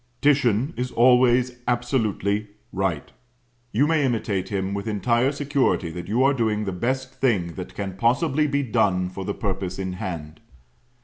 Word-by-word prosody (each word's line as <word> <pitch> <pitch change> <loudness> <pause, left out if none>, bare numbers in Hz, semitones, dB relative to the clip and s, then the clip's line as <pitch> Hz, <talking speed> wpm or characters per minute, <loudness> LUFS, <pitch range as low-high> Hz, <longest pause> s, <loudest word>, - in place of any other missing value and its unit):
Titian 135 -1 +2
is 125 +1 -2
always 125 0 +4
absolutely 110 -4 0 0.3
Right. 95 -6 -2 0.6
You 125 +7 +3
may 160 -1 +2
imitate 110 -7 -1
him 95 -1 -2
with 100 +2 -4
entire 115 +5 +1
security 140 - 0
that 85 +1 -7
you 115 +6 +2
are 140 +1 +4
doing 110 -4 0
the 95 - -2
best 130 +7 -2
thing 100 -11 +1
that - - -8
can 95 -2 -5
possibly 135 - +2
be 140 0 0
done 90 -6 +1
for 95 +1 -6
the 100 +2 -3
purpose 95 -3 -3
in 95 -1 -3
hand. 85 -5 -6
115 Hz, 160 wpm, -24 LUFS, 95-130 Hz, 0.6 s, always